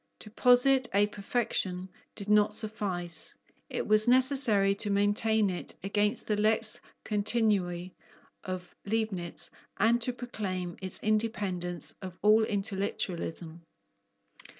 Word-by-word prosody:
To 210 - -10
posit 250 +2 +4
a 205 +1 +5
perfection 200 -3 -2 0.3
did 200 - -6
not 210 0 +3
suffice. 180 -7 -3 0.3
It - - -3
was 215 +1 +4
necessary 250 -6 +5
to 210 - 0
maintain 205 +1 +2
it 180 - -5
against 205 +3 0
the 210 - 0
lex 215 +1 +2 0.3
continui 200 -5 0 0.5
of 185 -1 -5 0.2
Leibnitz 200 -5 -2 0.3
and 230 +4 +3
to 250 - +1
proclaim 195 -8 -5
its 190 -1 +1
independence 200 -5 -1
of 185 -2 -8
all 215 +1 +5
intellectualism. 190 -5 -3
205 Hz, 110 wpm, -29 LUFS, 185-220 Hz, 0.5 s, a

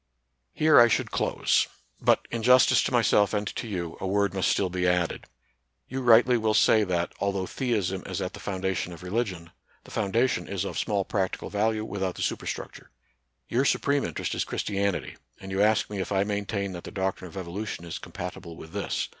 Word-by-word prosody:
Here 155 -1 +6
I 120 - +8
should 115 - 0
close; - - +1 0.3
but, - - +3
in 115 - -2
justice 125 +2 +6
to - - -1
myself 110 -4 +3
and 105 0 0
to - - -4
you, 85 -5 -4
a 95 - -2
word 100 0 +1
must 95 -1 +1
still 95 -2 +1
be 90 0 0
added. 90 -1 0 0.6
You 135 - -4
rightly 120 0 +6
will 110 -1 +1
say 110 -1 +5
that, 90 -3 -1
although 100 -2 -1
theism 100 -7 -1
is - - -3
at - - -3
the - - -9
foundation 95 -2 -2
of 85 - -11
religion, 90 -4 -3 0.3
the - - -15
foundation 115 +5 0
is - - -2
of - - -3
small 100 -2 0
practical 95 -3 -2
value 110 +1 0
without 95 -4 -3
the - - -3
superstruc - - -3
ture. - - -15 0.6
Your 125 +3 +1
supreme 140 0 +2
interest 85 - -3
is - - 0
Christianity; 100 -2 -2 0.2
and 95 0 -8
you 95 +1 0
ask 110 +1 +3
me 105 -1 -5
if 95 - -3
I 95 -1 +2
maintain 100 -1 -2
that 90 -1 -7
the - - -6
doc 95 -1 -1
trine 90 - -9
of 90 - -11
evolution 95 0 -5
is 85 - -5
compatible 85 -1 -7
with 80 -1 -11
this. 100 -1 -2
100 Hz, 200 wpm, -27 LUFS, 95-110 Hz, 0.6 s, I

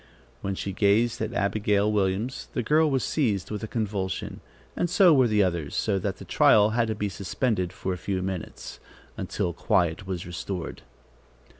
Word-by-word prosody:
When 95 0 -2
she 100 - -4
gazed 110 +4 +2
at 110 0 -2
Abigail 105 -1 +1
Williams, 105 +5 -1
the 125 - -1
girl 155 +6 +3
was 135 -3 +1
seized 105 - 0
with 105 -1 -3
a 110 - -4
convulsion, 100 -5 -3 0.3
and 175 - 0
so 180 -1 +6
were 130 -4 +5
the 105 -2 +3
others, 85 -6 -2
so 100 -3 +1
that - - -3
the - - -10
trial 105 0 +5
had 115 0 +1
to 110 - -2
be 105 0 -2
suspended 95 0 -1
for 95 - -3
a 90 - -6
few 95 0 -2
minutes, 95 -2 -6 0.4
until 85 - -2
quiet 85 +2 0
was 90 -3 -4
restored. 90 0 -5
100 Hz, 175 wpm, -26 LUFS, 95-115 Hz, 0.4 s, so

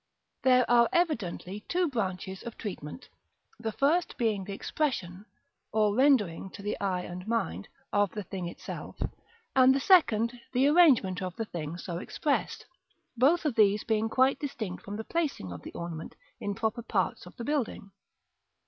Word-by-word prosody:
There 255 -1 +5
are 235 -1 +5
evidently 210 - -1
two 360 0 +2
branches 190 - -3
of 235 - -8
treatment: 185 - -7 0.5
the 225 -1 -2
first 300 +10 +1
being 215 -5 0
the 200 - -7
expression, 195 - -2 0.5
or 210 -1 +2
rendering 220 - +3
to 200 - -9
the 210 - -1
eye 185 -2 0
and 180 +2 -7
mind, 95 - -1 0.3
of 205 -1 +3
the 210 - -4
thing 185 -1 -5
itself; 175 - -8 0.6
and 260 0 +7
the - - +2
second, 245 - +4
the 260 +2 +4
arrangement 280 - +5
of 185 -1 -4
the 225 - -3
thing 165 -4 -5
so 175 -1 -5
expressed: 285 +8 -2 0.5
both 290 +8 +3
of 295 - +1
these 210 -2 +4
being 220 0 +1
quite 260 +3 +3
distinct 220 - -5
from 205 - -6
the 220 - -4
placing 295 - -2
of 85 - -7
the - - -9
ornament 170 -2 -6 0.2
in 205 -1 -3
proper 220 +3 -1
parts 195 -5 -1
of - - -13
the 235 - -6
building. 270 -8 -2
215 Hz, 165 wpm, -29 LUFS, 185-260 Hz, 0.6 s, and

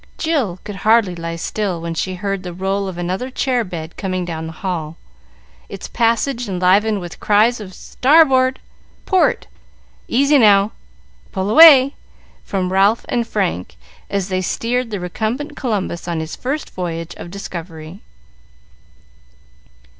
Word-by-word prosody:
Jill 280 - -1
could 205 -2 -7
hardly 215 -3 +3
lie 165 -1 -5
still 185 +1 -3
when 165 0 -4
she 185 +3 -3
heard 195 +1 -3
the 180 -1 -7
roll 195 +2 -1
of 185 -2 -6
another 185 +8 -3
chair 255 -2 0
bed 170 -4 -7
coming 185 -2 -2
down 160 -2 -5
the - - -6
hall, 165 -4 -3 0.7
its - - -7
passage 235 +1 0
enlivened 195 +4 +2
with 175 -2 -9
cries 215 +3 +3
of 190 -3 -9
"Starboard! 265 -2 +3 0.5
Port! 375 - +2 0.6
Easy 280 +3 +3
now! 205 -2 +5 0.6
Pull 190 +2 -2
away!" 280 -2 +8 0.5
from 185 -2 -2
Ralph 200 +4 +3
and 235 -1 0
Frank, 185 - -2 0.3
as 200 -1 -2
they 185 0 0
steered 240 +6 -1
the 205 -3 -4
recumbent 230 - -3
Columbus 200 - -3
on 170 -2 -2
his 160 0 -5
first 280 +4 -4
voyage 170 -1 -5
of - - -8
discovery. 170 -2 -8
195 Hz, 140 wpm, -19 LUFS, 175-235 Hz, 0.7 s, away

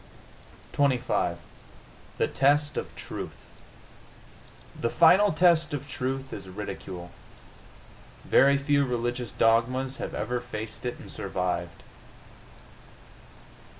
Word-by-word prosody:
XXV 125 -10 +1 0.8
THE - - +2
TEST 145 +2 +2
OF - - -5
TRUTH - - -7 1.3
The 115 - 0
final 180 - +6
test 165 -2 +3
of 145 0 -6
truth 135 0 -4
is 95 -2 -7
ridicule. 95 -2 -7 1.1
Very 140 +1 +5
few 140 0 +2
religious 120 -2 -2
dogmas 125 +4 +2
have - - -5
ever 120 +3 -2
faced 115 -1 -6
it 120 - -4
and - - -10
survived. 85 -2 -3
125 Hz, 95 wpm, -27 LUFS, 110-140 Hz, 1.3 s, final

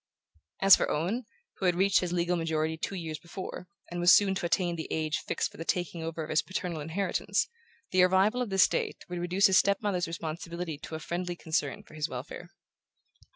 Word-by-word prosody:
As 195 0 +9
for - - -1
Owen, 195 +11 -1 0.3
who 190 - 0
had 175 - +3
reached 190 0 +4
his 180 -1 -2
legal 175 0 +1
majority 160 -1 -1
two 170 +4 -4
years 160 -4 -5
before, 180 +1 -7 0.2
and 175 - -3
was 175 +1 +6
soon 200 -2 +6
to 190 -2 -1
attain 175 0 +1
the 160 - -5
age 155 -1 -1
fixed - - -2
for - - -15
the 165 - -5
taking 175 0 -2
over 160 0 -4
of 155 - -6
his 155 - +3
paternal 180 -4 -4
inheritance, 165 +6 -1 0.4
the 185 - +4
arrival 190 +6 +4
of 245 - -2
this 195 -1 +5
date - - -3
would 175 0 -4
reduce 180 +3 +2
his 190 - +6
step 200 -1 +2
mother's 190 -5 -1
responsibility 165 -1 -5
to 160 - -7
a - - -4
friendly 175 +2 -3
concern 160 -4 -2
for - - -18
his 155 -1 -2
welfare. - - -7
175 Hz, 205 wpm, -29 LUFS, 160-190 Hz, 0.4 s, As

